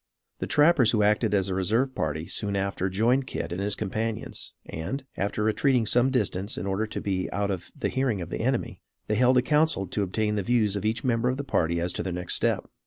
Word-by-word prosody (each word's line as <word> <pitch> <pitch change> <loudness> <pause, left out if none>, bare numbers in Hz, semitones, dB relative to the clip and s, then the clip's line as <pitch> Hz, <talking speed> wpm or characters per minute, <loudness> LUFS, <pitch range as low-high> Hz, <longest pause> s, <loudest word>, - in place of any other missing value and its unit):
The - - -3
trappers 150 -6 +5
who 105 -3 +3
acted 105 0 +2
as 95 -1 +1
a 95 - -2
reserve 110 +8 +1
party 80 - -2
soon 100 +3 -2
after 100 -1 -1
joined 120 +8 +2
Kit - - -4
and 90 +2 -3
his 100 0 -1
companions; 110 +2 -4
and, 130 - -5
after 100 +2 -1
retreating 120 +2 +2
some 125 +4 +3
distance 105 -6 -1
in 90 - -3
order 100 +3 -1
to - - -5
be 95 -2 -2
out 100 0 -1
of 90 -2 -5
the 145 - -1
hearing 130 -6 0
of 85 -1 -6
the - - -3
enemy, 130 +1 -1 0.2
they - - -1
held 125 +3 +4
a 125 - +4
council 150 -8 +2
to 105 - -2
obtain 105 +2 0
the - - +1
views 105 -1 +1
of 100 - -3
each 110 +1 0
member 120 -1 +1
of 130 - -1
the 140 - -3
party 85 - 0
as 85 +1 -2
to - - -3
their 95 - -3
next 90 0 0
step. - - +1
105 Hz, 235 wpm, -26 LUFS, 95-125 Hz, 0.2 s, trappers